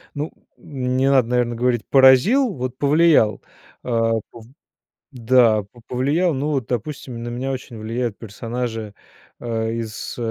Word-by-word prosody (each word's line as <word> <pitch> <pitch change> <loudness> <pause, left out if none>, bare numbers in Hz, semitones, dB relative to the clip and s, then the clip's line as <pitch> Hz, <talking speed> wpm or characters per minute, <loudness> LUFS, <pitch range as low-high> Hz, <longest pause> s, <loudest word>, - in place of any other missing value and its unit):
Ну 150 +2 -4 0.3
не 130 -1 -1
надо, 130 -4 +4
наверное, 120 -1 0
говорить 120 -1 0
поразил, 140 - +5
вот 130 -1 -5
повлиял. 145 - +3 0.4
А, 115 -2 +1 0.2
п 115 - -12 0.7
да, 120 -4 +3
п 120 +4 -20
повлиял, 145 +8 +1
ну 145 +1 -1
допустим, 125 0 -5
на 120 - -5
меня 130 +3 -3
очень 125 -3 -7
влияют 115 0 -3
персонажи, 115 0 -5 0.5
э, 115 -1 -2
из 115 -2 -5
125 Hz, 130 wpm, -21 LUFS, 115-135 Hz, 0.7 s, поразил